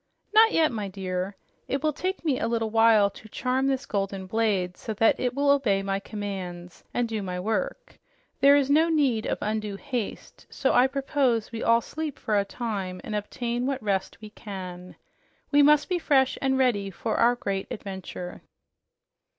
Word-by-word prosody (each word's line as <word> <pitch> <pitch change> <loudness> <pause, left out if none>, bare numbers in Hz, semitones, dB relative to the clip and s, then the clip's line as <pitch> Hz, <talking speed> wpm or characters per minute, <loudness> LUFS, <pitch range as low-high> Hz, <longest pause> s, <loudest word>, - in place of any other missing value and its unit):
"Not 445 +1 +7
yet, 320 -2 +3
my 215 -4 -3
dear. 190 0 -4 0.3
It 275 +1 -2
will 305 -1 +2
take 370 +3 -3
me 275 -5 +1
a - - 0
little 225 -1 -1
while 225 -2 +5
to 220 - -14
charm 260 +4 0
this 270 0 0
golden 195 -3 -2
blade 195 -3 0
so 220 - -6
that 225 +2 +3
it 250 -1 -1
will 280 0 +3
obey 220 -9 +2
my 195 0 -1
commands 190 -4 -6
and 245 -1 0
do 220 -2 -3
my 180 -2 -4
work. - - -3 0.4
There 280 +1 +7
is 280 -2 +3
no 315 +4 +4
need 275 -9 +1
of - - -1
undue 210 -1 -2
haste, 245 -1 -5
so 270 - 0
I 250 +2 +5
propose 265 -4 0
we 230 -1 -5
all 230 0 +4
sleep 310 +3 -5
for 215 - -1
a 200 - +3
time 200 -4 -4
and 215 - -6
obtain 240 +4 -2
what 270 -4 -2
rest 195 -2 -1
we 215 -1 -10
can. 185 -4 -8 0.6
We 290 0 +6
must 295 0 +5
be 360 -2 0
fresh 265 -5 +3
and 265 -1 +1
ready 225 -7 +1
for 220 +4 -3
our 240 +1 +4
great 195 -5 -3
adventure." 190 -3 -7
225 Hz, 185 wpm, -26 LUFS, 195-270 Hz, 0.6 s, Not